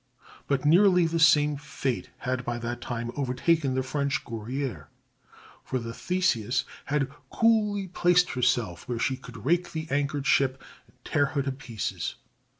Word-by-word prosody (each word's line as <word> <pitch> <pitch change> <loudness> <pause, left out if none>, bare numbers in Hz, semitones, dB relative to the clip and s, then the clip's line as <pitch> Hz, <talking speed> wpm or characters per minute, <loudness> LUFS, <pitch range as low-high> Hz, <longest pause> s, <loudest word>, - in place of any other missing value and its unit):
But 140 0 0
nearly 180 +2 +6
the 165 0 0
same 150 -3 +5
fate 135 -3 -3
had 125 0 -2
by 120 0 -2
that 120 +1 -4
time 120 -1 -4
overtaken 135 +1 +1
the 130 - +1
French 140 +1 -1
Guerrière, 115 - -4 0.8
for 130 - -2
the 115 -2 -5
Theseus 130 - 0 0.2
had 140 -2 0 0.2
coolly 210 -4 +2
placed 180 0 +3
herself 120 -7 0
where 120 - -2
she 130 +3 0
could 115 -3 -11
rake 175 +4 +1
the 160 0 -3
anchored 140 0 0
ship 135 -2 +3 0.3
and - - -28
tear 145 0 +2
her 140 - +2
to 135 - -1
pieces. 115 - -4
135 Hz, 150 wpm, -27 LUFS, 120-160 Hz, 0.8 s, nearly